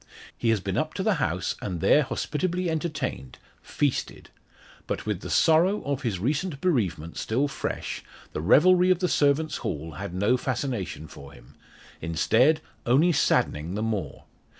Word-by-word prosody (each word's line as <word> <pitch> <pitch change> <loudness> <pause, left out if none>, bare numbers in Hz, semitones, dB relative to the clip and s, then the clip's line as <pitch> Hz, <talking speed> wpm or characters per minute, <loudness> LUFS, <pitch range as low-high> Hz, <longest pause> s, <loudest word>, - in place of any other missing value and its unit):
He 115 - -1
has 110 -2 +3
been 95 0 -3
up 155 0 -3
to 190 - -2
the 215 0 +3
house 90 -2 -1
and 90 -4 -4
there 150 - +5
hospitably 175 +5 -2
entertained 150 - -4 0.2
feasted. 145 -3 -2 0.6
But - - -3
with - - -2
the - - -7
sorrow 170 +6 +3
of 140 -1 -2
his 115 -7 -1
recent 140 - -1
bereavement 95 - -1
still 130 +6 0
fresh, 140 - -4 0.3
the - - -3
revelry 180 - +5
of 185 - +4
the 180 +1 0
servants' 150 0 +2
hall 80 +2 -4
had 75 - -6
no 105 +7 +2
fascination 120 - -3
for 70 -2 -12
him - - -17 0.5
instead, 110 - +3 0.2
only 145 +9 +4
saddening 85 - +1
the 105 - -2
more. 100 -10 -3
130 Hz, 155 wpm, -26 LUFS, -, 0.6 s, there